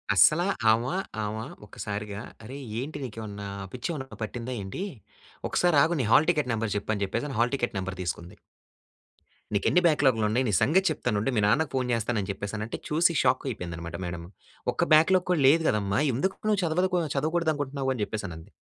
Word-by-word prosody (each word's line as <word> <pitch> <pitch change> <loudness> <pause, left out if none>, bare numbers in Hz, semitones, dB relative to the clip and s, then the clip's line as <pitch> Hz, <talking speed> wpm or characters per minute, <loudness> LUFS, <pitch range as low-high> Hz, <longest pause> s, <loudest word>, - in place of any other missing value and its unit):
అస్సలా 155 - +6 0.3
ఆమ, 115 +2 +2 0.4
ఆమ 105 0 -2 0.3
ఒక్కసారిగా 105 0 -5 0.2
"అరే! 130 +5 -8 0.2
ఏంటి 140 +5 -5
నీకేమన్నా 105 -4 -6 0.3
పిచ్చేమన్నా 135 +2 -5
పట్టిందా 120 +3 -4
ఏంటి? 95 - -5 0.7
ఒక్కసారి 175 -4 +3
ఆగు, 170 +1 +1
నీ - - 0
హాల్ 155 - +6
టిక్కెట్ 150 -7 +1
నెంబర్ 110 -2 -1
చెప్పు" 105 - -3
అని 100 - -2
చెప్పేసని 120 +5 -3
హల్ 120 +3 +1
టిక్కెట్ 120 -5 -2
నెంబర్ 95 0 -4
తీసుకుంది. 85 -1 -5 1.2
"నీకెన్ని 140 - +3
బ్యాక్‌లాగ్‌లు 130 -8 +3
ఉన్నాయి. 125 +5 +1
నీ - - +1
సంగతి 190 +6 +4
చెప్తానుండు 110 0 -1
మీ 105 - +3
నాన్నకు 155 +8 +2
ఫోన్ 130 -1 0
చేస్తాను" 115 0 0
అని 95 - -6
చెప్పేసనంటే 105 +3 -5
చూసి 165 +3 +3
షాక్ 130 0 +2
అయిపోయింది 90 -7 -5
అన్నమాట 85 0 -6
మేడం. 85 -1 -5 0.5
"ఒక్క - - +1
బ్యాక్‌లాగ్‌ 180 +4 +5
కూడా 165 - +2
లేదు 160 +5 +6
కదమ్మా! 100 +1 +1
ఎందుకు 190 +9 0
నువ్వు 205 -1 +2
చదవదుకు 180 +2 +1 0.2
చదవకూడదనుకుంటున్నావు?" 145 -3 0
అని 115 - -4
చెప్పేసనంది. 90 -8 -6
120 Hz, 165 wpm, -27 LUFS, 105-155 Hz, 1.2 s, అస్సలా